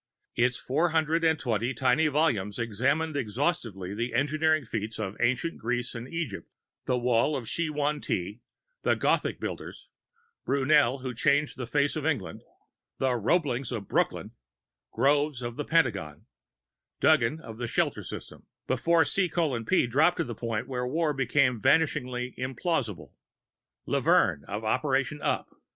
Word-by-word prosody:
Its 125 0 +1
four 155 +8 +1
hundred 160 +1 +1
and 160 -1 +3
twenty 120 -1 -1
tiny 135 +4 +3
volumes 135 -10 +1
examined 135 +8 0
exhaustively 115 - -2
the 120 +3 -3
engineering 155 +2 +2
feats 110 0 -4
of 100 -2 -4
ancient 130 +8 0
Greece 120 +2 -2
and 120 +1 -7
Egypt, 140 - -4 0.4
the 125 - +1
Wall 125 +4 +2
of 125 -5 -4
Shih 165 +7 -1
Hwang 150 -1 -1
Ti, 100 +6 -3 0.4
the - - +2
Gothic - - +1
builders, - - -6 0.5
Brunel 140 -2 +3
who 130 -1 -3
changed 140 +5 +2
the 125 -2 -5
face 140 +4 +1
of 155 - -3
England, 100 - -2 0.6
the 130 -1 +1
Roeblings 125 - 0
of 110 -5 -4
Brooklyn, - - 0 0.6
Groves 145 +1 +1
of 120 -1 -4
the 145 - -4
Pentagon, 105 - 0 0.7
Duggan 155 -1 +3
of 115 -7 -10
the 120 - -2
Shelter - - 0
System - - -9 0.2
(before 160 +6 +3
C:P 165 - +1
dropped 150 +9 +3
to - - +1
the 120 - -5
point 115 +1 -3
where 125 -1 -2
war 155 +3 0
became 135 -3 +2
vanishingly 125 -4 +1
implausible), 130 - -2 0.8
Levern 70 - +2
of 105 +3 -5
Operation 135 +5 0
Up. - - -2
130 Hz, 140 wpm, -28 LUFS, 115-150 Hz, 0.8 s, and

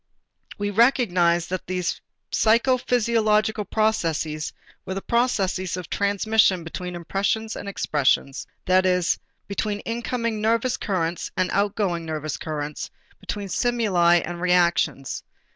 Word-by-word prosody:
We 205 0 -2
recognized 185 -8 +3
that 185 - -3
these 180 -1 -2 0.3
psychophysiological 225 -3 +2
processes 165 -8 0 0.3
were 190 +1 -4
processes 195 -6 0
of 180 -3 -8
transmission 200 -2 +2
between 180 +2 -6
impressions 200 +6 -1
and 200 - -6
expressions, 140 -6 0 0.2
that 185 0 +4
is, 180 -1 +2 0.3
between 205 +1 -2
incoming 230 -1 -2
nervous 230 +3 +2
currents 175 -4 -2
and 185 -1 +1
outgoing 200 -4 0
nervous 155 -2 -4
currents, 150 -2 -4 0.3
between 205 -1 -5
stimuli 195 -6 +2
and 175 0 -6
reactions. 170 -6 +1
190 Hz, 110 wpm, -24 LUFS, 175-220 Hz, 0.3 s, that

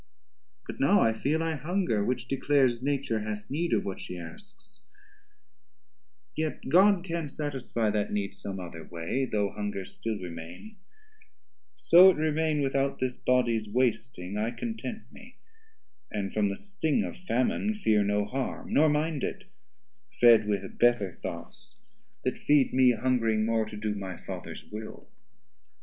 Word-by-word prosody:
But - - -8
now 195 +10 +4
I 115 - +3
feel 150 +8 0
I 165 0 0
hunger, 155 - 0
which 125 +1 -2
declares, 135 -2 +2
Nature 135 -5 -1
hath 105 0 -5
need 170 +4 -1
of 110 - +1
what 95 - -5
she 90 - -7
asks; 205 - -12 1.5
yet 155 -4 -3
God 190 +3 +5
Can 170 -4 -3
satisfie 135 -7 -2
that 105 -1 -1
need 100 -1 -2
some 100 -1 -6
other 85 -2 -8
way, 85 +12 -2
Though 105 -5 -1
hunger 105 -2 -4
still 110 +2 -4
remain: 90 - -9 1.0
so 180 +3 +7
it 190 - +3
remain 155 -1 +1
Without 135 0 0
this 130 -1 -1
bodies 120 -4 +1
wasting, 110 -5 -1
I 110 +2 0
content 225 - -5
me, 245 +3 -15 0.7
And 100 -2 -3
from 105 -2 +2
the 100 - -4
sting 195 -1 -1
of - - -5
Famine 130 - +1
fear 110 - +2
no 105 0 +1
harm, 130 +4 -4
Nor 155 +2 +5
mind 150 0 0
it, - - -3 0.8
fed 115 -3 +7
with 100 -2 -3
better 120 -7 +3
thoughts - - -8 0.5
that - - -2
feed 145 -2 +3
Mee 130 -1 +5
hungring 115 -4 +1
more 115 -1 +1
to 105 - -8
do 105 0 -2
my 95 -3 -6
Fathers - - -8
will. 110 +1 -9
125 Hz, 150 wpm, -28 LUFS, 105-155 Hz, 1.5 s, so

